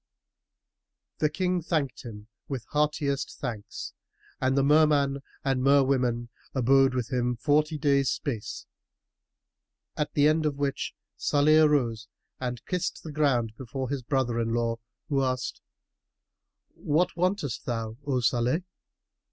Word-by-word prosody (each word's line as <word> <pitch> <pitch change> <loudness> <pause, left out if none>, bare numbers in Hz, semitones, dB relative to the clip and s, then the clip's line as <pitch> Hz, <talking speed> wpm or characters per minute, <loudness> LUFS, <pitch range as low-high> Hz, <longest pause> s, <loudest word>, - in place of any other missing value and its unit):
The 150 - +3
King 180 +1 0
thanked 155 -5 -1
him 105 -4 -9 0.2
with 135 -4 -4
heartiest 150 -2 0
thanks 110 -5 -5 0.5
and 130 +1 +1
the 140 - +4
Merman 145 -2 +4 0.3
and 135 -2 +1
Merwomen 130 -3 +3 0.3
abode 135 +1 +4
with 125 +1 -2
him 125 0 +1
forty 150 +4 +1
days' 140 -2 +2
space, 115 -7 -4 1.3
at 150 - -1
the 145 0 +4
end 155 0 +3
of 145 - -1
which 140 -1 -2 0.2
Salih 150 +2 +4
arose 120 -8 +2 0.3
and 125 -2 -4
kissed 180 -2 -2
the 160 - -6
ground 135 -7 +1
before 130 +1 -4
his 140 -1 -2
brother 125 -2 0
in 115 0 0
law, 115 -1 0 0.3
who 140 -4 +1
asked 130 -1 -2 1.1
"What 170 +5 0
wantest 180 - -1
thou, 115 -2 -3
O 135 -3 0
Salih?" 125 +7 +1
135 Hz, 125 wpm, -27 LUFS, 120-150 Hz, 1.3 s, the